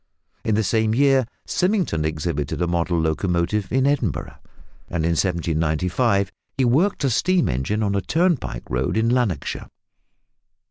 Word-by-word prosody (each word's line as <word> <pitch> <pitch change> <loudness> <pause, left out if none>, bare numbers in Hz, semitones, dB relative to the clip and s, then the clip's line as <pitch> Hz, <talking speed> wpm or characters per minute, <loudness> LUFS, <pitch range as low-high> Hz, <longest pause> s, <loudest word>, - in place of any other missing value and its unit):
In 110 - +1
the 110 - +2
same 110 +1 +1
year 135 -2 +3 0.2
Symington 180 - 0
exhibited 75 -2 -2
a 90 - +1
model 85 0 0
locomotive 85 +5 0
in 130 +2 +2
Edinburgh, 130 - -1 0.5
and 85 -2 -1
in 85 - +2
1795 90 +4 0 0.3
he 130 - +2
worked 150 +10 +2
a 135 - +3
steam 180 +8 +2
engine 85 - -1
on 100 -1 0
a 100 - 0
turnpike 160 - 0
road 65 - -1
in 115 +1 +2
Lanarkshire. 120 -9 -1
100 Hz, 140 wpm, -22 LUFS, 85-130 Hz, 0.5 s, year